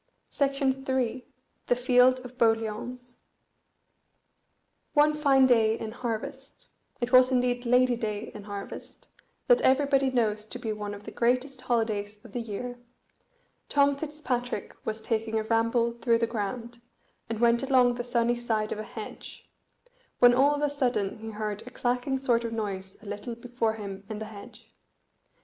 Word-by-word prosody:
The 265 -3 0 0.5
Field 250 +1 +4
of 250 0 -10
Boliauns 230 +2 -1 1.8
One 300 +1 +5
fine 280 -3 +4
day 225 -3 +4
in 220 - -5
harvest 230 -2 -6 0.3
it 240 0 -2
was 255 0 +7
indeed 245 -1 +1
Lady 250 0 +4
day 215 -3 -4
in 205 - -9
harvest, 200 -1 -8 0.4
that - - +5
everybody 270 0 +3
knows 215 -4 0
to 250 - -6
be 225 -3 -3
one 205 -1 -5
of 205 - -12
the - - -8
greatest 255 +2 0
holidays 215 -4 -1
in 230 - -12
the 245 - -3
year 245 +3 -6 0.9
Tom 280 0 +4
Fitzpatrick 275 -7 -3
was 220 0 -4
taking 225 0 -1
a 220 - 0
ramble 230 +1 +2
through 235 0 +1
the 230 - +1
ground, 235 +2 -4 0.5
and 225 -1 -3
went 235 0 +4
along 255 -2 +4
the 240 0 -4
sunny 240 -1 +1
side 225 -3 -1
of - - -3
a - - -3
hedge; 215 0 -9 0.7
when 245 0 +7
all 280 +4 +4
of 290 - -3
a 295 - +3
sudden 245 -9 -1
he 225 0 -7
heard 210 -1 -4
a 250 - -10
clacking 250 +2 -1
sort 245 -3 +1
of 230 - -3
noise 195 -4 -4
a - - -13
little 205 +4 -5
before 235 -1 -1
him 200 -3 -7
in 215 - -4
the 220 - -5
hedge. 215 +2 -13
240 Hz, 155 wpm, -28 LUFS, 220-255 Hz, 1.8 s, was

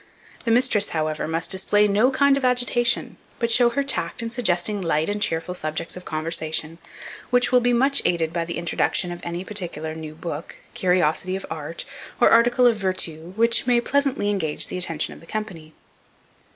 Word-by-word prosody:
The - - 0
mistress, 225 -3 +2
however, 155 0 -2
must 165 +1 -2
display 205 +2 +3
no 210 +5 +3
kind 280 +1 +3
of 275 - -3
agitation, 245 -1 +1 0.2
but 235 0 -1
show 240 +1 +5
her 280 +4 -1
tact 275 -3 -2
in 230 - -4
suggesting 205 -3 0
light 160 -1 0
and 205 0 -2
cheerful 165 -3 -1
subjects 155 -2 -3
of 180 - -10
conversation, 160 0 -1 0.5
which 245 0 +2
will 250 - +6
be 245 0 +1
much 270 +4 +3
aided 165 -2 0
by 170 -1 -1
the 170 - -5
introduction 175 +1 0
of 175 - -7
any 170 +1 -4
particular 175 -6 -3
new 155 -1 -8
book, 165 -1 -7 0.2
curiosity 180 0 +1
of 195 - -5
art, 160 +1 -5 0.3
or - - +5
article 240 +2 +4
of 235 -3 +4
vertu, 180 -4 -4
which 230 +2 +3
may 245 -1 +4
pleasantly 265 -5 0
engage 160 -7 -1
the - - -4
attention 165 -3 -1
of - - -13
the 165 - -17
company. 190 -8 -6
185 Hz, 180 wpm, -23 LUFS, 165-235 Hz, 0.5 s, will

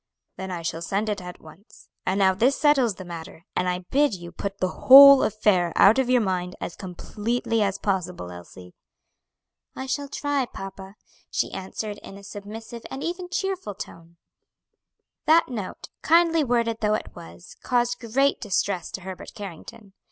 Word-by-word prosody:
"Then 190 0 -6
I 175 -2 -5
shall 165 0 -3
send 200 +5 -1
it 205 -2 -2
at 180 0 -9
once. 160 +6 -17 0.2
And 190 +1 +1
now 190 -1 +4
this 245 +8 +2
settles 275 -8 +3
the 185 - -9
matter, 170 -1 -9
and 180 - 0
I 180 0 -3
bid 285 -5 +3
you 175 -1 -9
put 195 +3 -5
the 185 -1 -4
whole 275 +1 +11
affair 200 -5 +2
out 215 +6 +6
of 260 -2 0
your 250 -1 +4
mind 185 -2 -2
as - - -6
completely 215 +5 -3
as 200 -1 0
possible, 180 - -3
Elsie." 90 +1 -12 1.0
"I 265 - -5
shall 285 +2 -2
try, 285 -2 -1
papa," 195 -1 -9 0.3
she - - -1
answered 205 +2 -5
in 195 - -11
a 200 - -13
submissive 215 +4 -9
and 270 - -6
even 355 +1 -4
cheerful 375 - -3
tone. 170 -2 -10 1.1
That 320 0 +5
note, 215 -7 -6
kindly 330 -1 +4
worded 235 -3 0
though 210 0 +2
it - - -6
was, 170 +1 -12
caused 245 0 0
great 265 +4 +1
distress 200 -3 -1
to 195 - -5
Herbert 185 0 -9
Carrington. 200 +1 -10
205 Hz, 165 wpm, -25 LUFS, 185-250 Hz, 1.1 s, whole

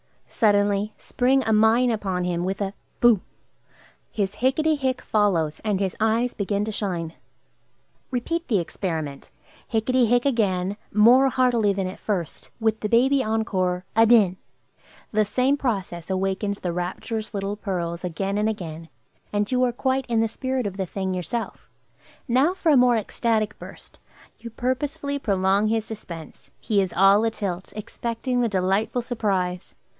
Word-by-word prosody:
Suddenly 205 -1 +1
spring 260 +2 +1
a 220 - +1
mine 225 +3 +4
upon 190 -5 -2
him 175 -1 -1
with 190 +1 -2
a 195 0 -2 0.3
"Boo!" 235 -6 +5 0.9
His 200 -3 -2
"Hicketty 305 +5 +2
hick!" 260 -3 -1
follows, 170 -8 +1
and 210 -3 0
his 195 -2 -1
eyes 225 +3 +1
begin 200 0 -1
to 220 - -3
shine. 175 -6 -3 1.0
Repeat 330 +7 -2
the 220 - +2
experiment. 160 -5 -4 0.4
"Hicketty 240 +2 +2
hick!" 245 +2 +2
again, 200 -7 0
more 245 +6 +6
heartily 240 -6 +2
than 195 -1 -2
at 185 - -6
first, 180 -7 -4
with 220 -1 +1
the 210 - -3
baby 265 +4 +4
encore, 185 -5 -1
"Adin!" 225 -5 +5 0.7
The 215 0 +3
same 255 +7 +1
process 195 - -3
awakens 195 +2 -1
the 175 -2 -2
rapturous 210 +5 -4
little 200 +1 -2
pearls 175 -4 -4
again 195 +3 -2
and 215 +1 +2
again, 165 -6 -6 0.4
and 205 +1 -1
you 255 0 +2
are 250 - +2
quite 260 +2 -1
in 230 -2 +1
the 225 - +2
spirit 260 +2 -3
of 200 -1 -4
the 190 -2 -2
thing 190 +1 -3
yourself. 185 - -4 0.6
Now 270 +9 +3
for 340 -4 +2
a 285 - +6
more 245 -1 +5
ecstatic 215 0 -1
burst. - - -12 0.4
You 235 - -8
purposely 280 +4 -2
prolong 195 -2 +2
his 220 0 0
suspense; 170 -8 -9
he 205 -3 +1
is 190 -2 -2
all 195 +2 +5
atilt, 200 -5 -3
expecting 235 +3 -3
the 235 - +1
delightful 195 +5 0
surprise. 190 -7 -2
210 Hz, 150 wpm, -24 LUFS, 190-240 Hz, 1.0 s, more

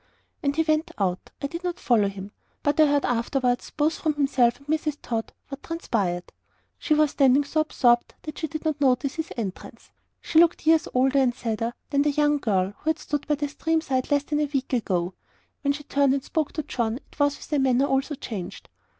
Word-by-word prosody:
And 280 0 0
he 320 - +3
went 310 +1 +1
out. 185 -3 -1
I - - +1
did 335 +5 -5
not 355 -1 -3
follow 220 -5 +3
him; 195 0 -8 0.3
but 290 +1 +1
I 310 - +7
heard 285 -1 +2
afterwards, 245 +1 0
both 305 +2 0
from 310 -2 0
himself 265 -5 +2
and 280 - -21
Mrs. 300 -1 -1
Tod, 225 -2 -3 0.2
what 275 0 -7
transpired. 200 - -2 0.5
She 305 - +2
was 300 -1 +3
standing 275 0 +4
so 310 +2 0
absorbed 240 -6 +2
that 305 -1 -7
she 315 - -2
did 310 +1 -6
not 305 -2 -1
notice 265 0 +2
his 320 0 -5
entrance. 200 -5 -6 0.3
She 320 - +2
looked 340 -2 +4
years 320 0 +4
older 265 +2 +3
and 250 -3 +2
sadder 230 -1 -3 0.2
than 280 -1 +3
the 295 - +2
young 295 0 +2
girl 195 -5 0
who 315 - -2
had 320 - +1
stood 295 -1 -4
by 300 - +2
the 290 0 -2
stream 325 +3 0
side 260 -5 -2
less 285 -1 +2
than 295 0 -1
a 300 -1 0
week 270 -2 -2
ago. 185 -7 0 0.5
When 280 - +1
she 290 +1 -5
turned 280 -1 +2
and 275 - -3
spoke 315 -3 -1
to 310 - -3
John 235 -6 -1
it 285 - -19
was 285 0 +2
with - - -9
a 295 - +3
manner 265 0 +3
also 275 +2 0
changed. 210 -8 -7
280 Hz, 220 wpm, -25 LUFS, 245-305 Hz, 0.5 s, I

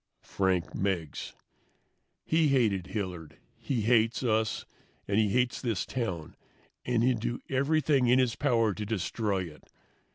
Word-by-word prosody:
Frank 95 -3 0
Meggs. 90 -6 -2 0.9
"He 160 -1 +3
hated 110 -10 +2
Hilliard, 90 -7 -5 0.2
he 125 -5 -2
hates 115 +2 +2
us, 110 -2 0 0.4
and 100 +2 +2
he 105 -2 +3
hates 125 +3 +1
this 115 -7 -1
town, 95 -11 -4 0.5
and 120 -2 +1
he'll 125 -2 +2
do 120 +2 -2
everything 140 -1 +2
in 125 +2 +5
his 125 -3 +2
power 115 -4 +2
to 105 - -5
destroy 105 -1 -1
it. 80 -4 -12
110 Hz, 135 wpm, -29 LUFS, 95-125 Hz, 0.9 s, in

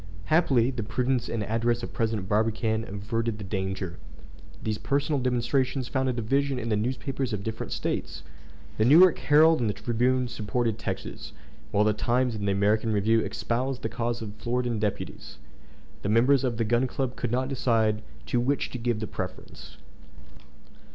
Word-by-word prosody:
Happily 135 -7 +3
the 125 -3 -4
prudence 125 +3 -1
and 115 -2 -2
address 115 +2 0
of - - -6
President 110 -4 -1
Barbicane 110 +1 +1
averted 110 +3 -2
the 105 - -7
danger. 95 -2 -3 0.6
These 110 -1 -2
personal 140 0 0
demonstrations 125 +1 0
found 130 0 0
a - - 0
division 135 +4 0
in 115 -2 -3
the 105 - +2
newspapers 130 +3 -2
of 100 - -2
the - - -10
different 110 +1 -4
States. 70 0 -3 0.6
The 110 - +4
New 140 +6 +7
York 185 -2 +6
Herald 155 +2 +5
and 115 -3 +1
the 105 - -2
Tribune 125 +3 +1
supported 115 0 -2
Texas, - - -5 0.4
while 100 +8 +2
the 105 0 +3
Times 120 +3 +1
and 100 -2 -3
the - - +3
American 105 +3 +2
Review 110 +2 +3
espoused 125 +3 -2
the 110 - -1
cause 115 0 -2
of 105 -1 -7
the - - -19
Floridan 120 -1 0
deputies. 105 -1 -4 0.6
The 100 - -2
members 125 +5 +4
of 120 -3 -1
the 115 - +1
Gun 120 +4 +2
Club 130 -1 -3
could 125 - -3
not 130 +2 0
decide 115 -5 +1 0.2
to 120 - 0
which 135 +4 0
to 125 - -5
give 115 -2 -1
the - - -1
preference. - - -7
115 Hz, 180 wpm, -27 LUFS, 110-130 Hz, 0.6 s, New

